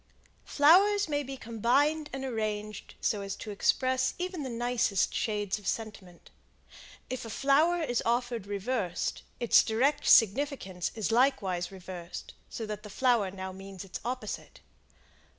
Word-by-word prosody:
Flowers 390 +7 +5
may 290 -1 0
be 270 -1 -6
combined 270 +7 +1
and 270 +1 -4
arranged 215 -3 -4
so 205 - 0
as 195 0 -4
to 215 - -7
express 260 +5 +1
even 360 -2 -4
the 265 - -4
nicest 235 -4 0
shades 210 -2 -1
of 200 - -10
sentiment. 200 -6 -5 0.8
If 255 - -4
a 225 - -7
flower 305 +8 +3
is 245 -6 0
offered 235 -3 -1
reversed, 205 -2 -2 0.2
its 235 - +5
direct 250 +7 +1
significance 205 - +3
is 220 -1 -2
likewise 200 -8 +1
reversed, 180 -2 -8 0.2
so 225 - -5
that 210 -1 -5
the 210 - -10
flower 235 -3 +2
now 190 0 -6
means 195 0 -9
its 185 - -7
opposite. 250 +2 -5
230 Hz, 140 wpm, -29 LUFS, 200-265 Hz, 0.8 s, Flowers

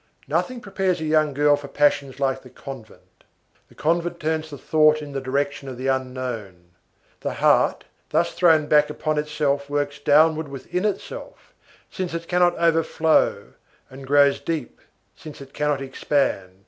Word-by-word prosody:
Nothing 255 -2 -1
prepares 190 -3 -1
a 160 - -4
young 155 -1 +2
girl 145 +1 +3
for 145 0 -8
passions 140 -1 +1
like 135 -1 0
the 130 - -14
convent. 130 -4 -12 0.5
The - - -20
convent 170 +2 -1
turns 160 0 -2
the 145 - -8
thoughts 155 +1 +3
in 150 -1 -8
the 135 -1 -4
direction 140 +1 -2
of 130 - -8
the 130 - -6
unknown. 125 -9 -4 0.5
The - - -4
heart, - - +3 0.3
thus 170 +2 +1
thrown 160 -4 +4
back 150 0 +4
upon 155 0 -1
itself, 150 -2 -1
works 145 0 -2
downward 155 +1 +3
within 140 +8 -4
itself, 210 - -5 0.4
since 180 -3 -4
it 170 0 -5
cannot 175 0 +2
overflow, 165 -1 +1 0.4
and 135 0 -11
grows 140 0 +4
deep, 160 -6 -5 0.3
since 155 -2 -11
it 135 0 -12
cannot 150 -2 -1
expand. 130 -9 -1
145 Hz, 155 wpm, -23 LUFS, 135-160 Hz, 0.5 s, thrown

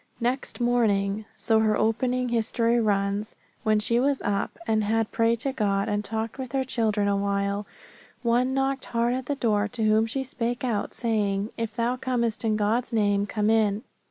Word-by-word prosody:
"Next 250 +3 -2
morning," 215 -4 +1
so 220 +1 +2
her 215 -1 +2
opening 250 +3 +1
history 235 0 +1
runs, 205 -1 0 0.3
"when 215 -3 +2
she 230 +3 +2
was 275 +1 +1
up, 200 -1 -1
and 220 -1 +1
had 225 +1 0
prayed 230 0 +1
to 275 - 0
God, 200 -4 0
and 205 0 -1
talked 225 +3 -3
with 260 -1 -6
her 270 -1 +1
children 220 -5 0
awhile, 200 0 0 0.6
one 245 +2 +2
knocked 270 0 0
hard 235 +1 0
at 255 0 -3
the 285 - 0
door 215 -6 +1
to 225 +1 -4
whom 215 +1 +3
she 265 +4 -2
spake 245 -1 -3
out, 230 -5 -2
saying, 210 -3 0
If 230 -1 -4
thou 240 +2 0
comest 240 -3 -1
in 220 -1 +1
God's 215 +4 0
name, 205 -2 +2
come 210 +1 +1
in. 215 -1 +2
225 Hz, 180 wpm, -26 LUFS, 210-245 Hz, 0.6 s, whom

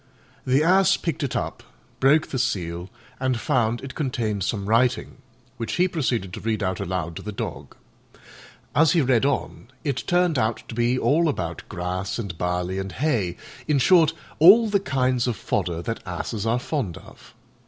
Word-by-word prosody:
The 135 +4 +3
Ass 190 +3 +4
picked 165 -1 -3
it 140 -4 -2
up, - - -3 0.4
broke 145 +4 +4
the 130 - -2
seal, 90 -7 -2 0.3
and 130 -3 0
found 115 +1 +1
it 135 - -7
contained 115 - -2
some 100 0 -2
writing, 120 +5 +1 0.4
which 115 - -4
he 180 +1 +3
proceeded 125 - -2
to - - -5
read 110 -2 -1
out 95 -1 -1
aloud 90 -4 -3
to - - -6
the 105 - -6
Dog. 100 - -6 1.0
As 160 0 +4
he 170 - +4
read 130 -1 +3
on 140 -4 -3 0.2
it 140 -4 -2
turned 175 -5 +2
out 110 +1 -1
to - - -6
be 120 +2 +1
all 160 +5 +2
about 85 - -3
grass 90 +1 -3
and 100 -8 -5
barley 90 +2 -2
and 95 -1 -5
hay 115 - 0 0.3
in 150 -2 +3
short, 160 +2 +5 0.3
all 205 +8 +8
the 200 -1 +3
kinds 130 -6 0
of 120 - 0
fodder 85 -4 -2
that 115 +3 -4
Asses 100 +4 -4
are 115 +2 +2
fond 125 - -3
of. - - -16
120 Hz, 175 wpm, -24 LUFS, 95-145 Hz, 1.0 s, all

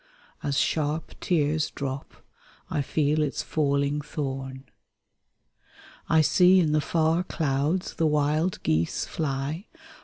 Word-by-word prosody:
'' - - -29
As 140 -1 -1
sharp 155 0 0
tears 155 -2 +1
drop 135 -1 -5 0.6
I 145 - 0
feel 150 +2 +1
its 150 -2 -1
falling 140 -1 0
thorn. 135 -3 -5 1.5
I 160 - +5
see 180 +4 +5
in 160 -4 +2
the 150 0 +2
far 165 +3 +1
clouds 155 +1 -1
the 165 - +1
wild 150 +4 +1
geese 80 +1 0
fly. 150 - -3
150 Hz, 120 wpm, -26 LUFS, 140-160 Hz, 1.5 s, I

